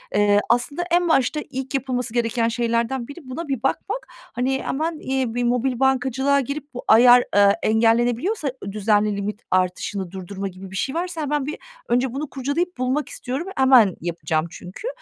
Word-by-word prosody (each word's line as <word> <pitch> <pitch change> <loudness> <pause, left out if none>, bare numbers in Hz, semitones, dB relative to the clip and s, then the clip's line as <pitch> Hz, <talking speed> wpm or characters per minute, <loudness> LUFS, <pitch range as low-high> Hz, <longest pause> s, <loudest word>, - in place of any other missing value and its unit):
Eee, 205 0 +4
aslında 245 +8 +1
en 350 0 +3
başta 270 0 +2
ilk 265 0 -5
yapılması 250 -3 -2
gereken 230 -1 +1
şeylerden 235 +1 -1
biri 285 +4 -9
buna 320 +6 -5
bir 265 -4 -3
bakmak. 420 - -2
Hani, 265 - -3
hemen, 315 +3 -2
eee, 260 -3 -1
bir 245 - 0
mobil 245 +1 0
bankacılığa 265 +1 +2
girip 280 +2 -6
bu 250 - -6
ayar, 245 +2 +7
eee, 200 0 +6
engellenebiliyorsa, 240 - +2 0.2
ııı, 200 - -5
düzenli 210 0 +1
limit 205 +2 -4
artışını 185 0 -1
durdurma 195 +1 -5
gibi 190 0 -10
bir - - -8
şey 265 +9 -2
varsa 345 -1 -3
hemen 295 -1 -1
bir 300 - -4 0.3
önce 245 +1 +1
bunu 285 +2 -4
kurcalayıp 285 +7 -2
bulmak 255 +4 -1
istiyorum, 270 +8 -5
hemen 255 -8 +6
yapacağım 160 -2 -1
çünkü. 180 - -8
250 Hz, 170 wpm, -22 LUFS, 215-280 Hz, 0.3 s, ayar